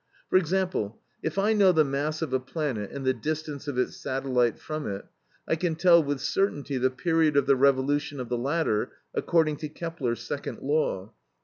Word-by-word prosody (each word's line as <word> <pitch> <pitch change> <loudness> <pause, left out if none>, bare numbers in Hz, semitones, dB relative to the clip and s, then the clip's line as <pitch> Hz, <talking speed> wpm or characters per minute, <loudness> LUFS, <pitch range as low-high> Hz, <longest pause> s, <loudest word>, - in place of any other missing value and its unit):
For - - +6
example, 180 - 0 0.2
if - - -3
I 205 +3 +3
know 200 -3 +6
the 160 -3 +4
mass 145 +3 -1
of 145 -5 -4
a 130 - +3
planet 130 -6 -3
and 140 -1 -6
the 130 - +3
distance 150 +3 -4
of 140 -3 -3
its 125 - 0
satellite 130 -3 0
from 155 -1 -5
it, 100 -1 -5 0.4
I - - +2
can 165 0 -1
tell 170 0 +6
with 145 -3 -2
certainty 145 -5 0
the 130 +1 +3
period 155 +3 +2
of 140 - +4
the 140 0 +5
revolution 140 +2 +2
of 125 - -4
the 120 - -1
latter 135 -2 0 0.2
according 160 -3 +2
to 155 - -5
Kepler's 150 -8 -3
second 145 - -4
law. 130 -8 0
145 Hz, 190 wpm, -27 LUFS, 130-160 Hz, 0.4 s, For